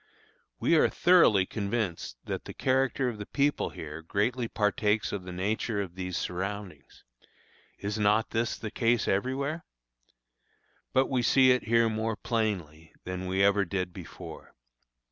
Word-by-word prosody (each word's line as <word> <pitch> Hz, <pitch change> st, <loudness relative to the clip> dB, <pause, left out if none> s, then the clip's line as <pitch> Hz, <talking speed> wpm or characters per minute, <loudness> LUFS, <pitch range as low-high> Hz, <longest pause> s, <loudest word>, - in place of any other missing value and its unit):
We 170 Hz, -, +3 dB
are -, -, +4 dB
thoroughly 165 Hz, -, +5 dB
convinced 100 Hz, -, -3 dB
that -, -, -4 dB
the -, -, -8 dB
character 130 Hz, 0 st, +1 dB
of 115 Hz, -4 st, -4 dB
the 105 Hz, -, -6 dB
people 145 Hz, +1 st, +1 dB
here 80 Hz, +1 st, -8 dB
greatly 115 Hz, +8 st, -1 dB
partakes 105 Hz, 0 st, +1 dB
of 95 Hz, -3 st, -4 dB
the 90 Hz, -, -6 dB
nature 105 Hz, +4 st, -1 dB
of 95 Hz, -4 st, -4 dB
these 90 Hz, -1 st, -4 dB
surroundings. 95 Hz, -3 st, -5 dB, 0.7 s
Is 105 Hz, +2 st, -3 dB
not 105 Hz, +2 st, +2 dB
this 115 Hz, +1 st, -1 dB
the 110 Hz, -, -6 dB
case 115 Hz, -1 st, +1 dB
everywhere? 135 Hz, -, -1 dB, 1.3 s
But 130 Hz, +1 st, +3 dB
we 130 Hz, -2 st, 0 dB
see 130 Hz, +2 st, +5 dB
it 125 Hz, -, +1 dB
here 115 Hz, 0 st, +4 dB
more 110 Hz, 0 st, -1 dB
plainly 100 Hz, -9 st, -3 dB
than 90 Hz, 0 st, -5 dB
we 95 Hz, +1 st, +1 dB
ever 100 Hz, 0 st, +4 dB
did 90 Hz, -1 st, -3 dB
before. -, -, -10 dB
105 Hz, 145 wpm, -29 LUFS, 95-120 Hz, 1.3 s, thoroughly